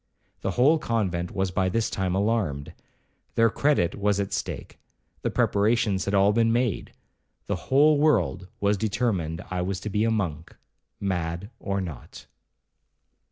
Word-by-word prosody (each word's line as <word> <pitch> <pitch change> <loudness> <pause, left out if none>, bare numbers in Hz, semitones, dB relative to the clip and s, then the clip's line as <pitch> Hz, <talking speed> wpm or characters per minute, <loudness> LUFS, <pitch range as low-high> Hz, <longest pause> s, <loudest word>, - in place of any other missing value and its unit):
The - - -1
whole 150 +6 +5
convent 95 - -1
was 95 -2 -1
by 95 +1 +1
this 115 +4 0
time 95 -1 -1
alarmed—their 100 +2 -2
credit 140 - +2
was 100 0 0
at 100 -1 -2
stake—the - - -6
preparations 105 -2 +1
had 100 - 0
all 100 +1 +4
been 115 0 +3
made—the 120 -3 -4
whole 145 +2 +3
world 115 - +2
was 100 0 +2
determined 95 -7 -1
I 90 -1 -1
was 95 +1 -2
to 105 - -4
be 105 +2 +1
a 115 - +2
monk, 85 -8 -2 0.4
mad 90 +1 -3
or 100 -1 -2
not. 85 -8 -8
100 Hz, 135 wpm, -26 LUFS, 90-115 Hz, 0.4 s, whole